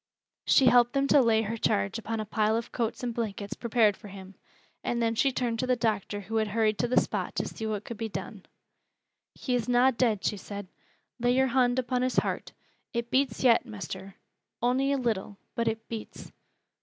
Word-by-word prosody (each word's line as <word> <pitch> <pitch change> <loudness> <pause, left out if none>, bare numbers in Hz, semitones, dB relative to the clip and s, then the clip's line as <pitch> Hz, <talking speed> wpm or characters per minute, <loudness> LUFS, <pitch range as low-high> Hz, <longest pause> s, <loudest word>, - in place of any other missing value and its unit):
She 265 - +5
helped 240 0 +5
them 275 0 +2
to 290 - +6
lay 225 -2 +3
her 225 +2 -3
charge 100 - 0
upon 225 0 -4
a 215 - -3
pile 215 +1 +1
of 230 - -5
coats 235 0 -2
and 240 -1 -2
blankets 205 -3 -3
prepared 225 -3 +2
for 210 - -12
him, 190 -1 -10 0.5
and 240 - -1
then 230 -1 +1
she 270 +4 +2
turned 240 -3 -1
to 255 - -1
the 250 - +3
doctor 210 -3 -1
who 225 +3 -3
had 220 -1 +1
hurried 215 0 +1
to 245 - +1
the 250 - +4
spot - - -3
to - - -1
see 220 - -5
what 210 -1 -3
could 235 - -7
be 225 0 -3
done. - - -7 0.9
"He 255 - -3
is 245 0 0
na 245 +2 +5
dead," 230 -5 0
she 210 - 0
said. 200 0 -8 0.5
"Lay 245 +1 +2
yore 265 0 +3
hond 250 0 +2
on 250 +1 0
his 255 0 0
heart. - - -1 0.4
It 235 0 -2
beats 260 -2 +1
yet, 240 -3 +5
Mester, 195 -3 -7 0.4
on'y 260 +3 +2
a 280 - +2
little, 220 -5 -2 0.2
but 230 0 -1
it 225 0 -2
beats." 225 -2 -8
230 Hz, 205 wpm, -28 LUFS, 215-245 Hz, 0.9 s, to